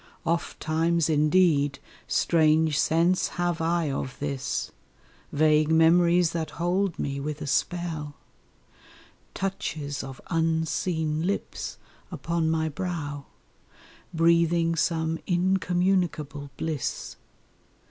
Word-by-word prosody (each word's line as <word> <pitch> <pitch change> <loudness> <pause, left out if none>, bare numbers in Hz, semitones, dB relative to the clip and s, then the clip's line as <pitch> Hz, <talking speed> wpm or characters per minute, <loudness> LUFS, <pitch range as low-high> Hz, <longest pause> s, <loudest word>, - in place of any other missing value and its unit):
Ofttimes 165 0 0
indeed 150 -2 +3 0.3
strange 155 -2 +3
sense 170 +4 +2
have 175 -1 0
I 165 -2 +1
of 135 -1 -4
this, 140 -2 -3 0.6
Vague 155 0 +3
memories 170 +1 +4
that 160 -2 -3
hold 180 +2 0
me 140 0 -3
with 150 +1 -4
a - - -5
spell, 155 -1 -2 1.2
Touches 155 -8 -3
of 135 -1 -8
unseen 160 0 0
lips 200 - -3 0.3
upon 165 -1 -1
my 160 0 +1
brow, 145 -3 -4 0.9
Breathing 170 0 +3
some 160 +1 0
incommunicable 180 -5 0
bliss! 155 -5 -3
160 Hz, 90 wpm, -26 LUFS, 150-170 Hz, 1.2 s, memories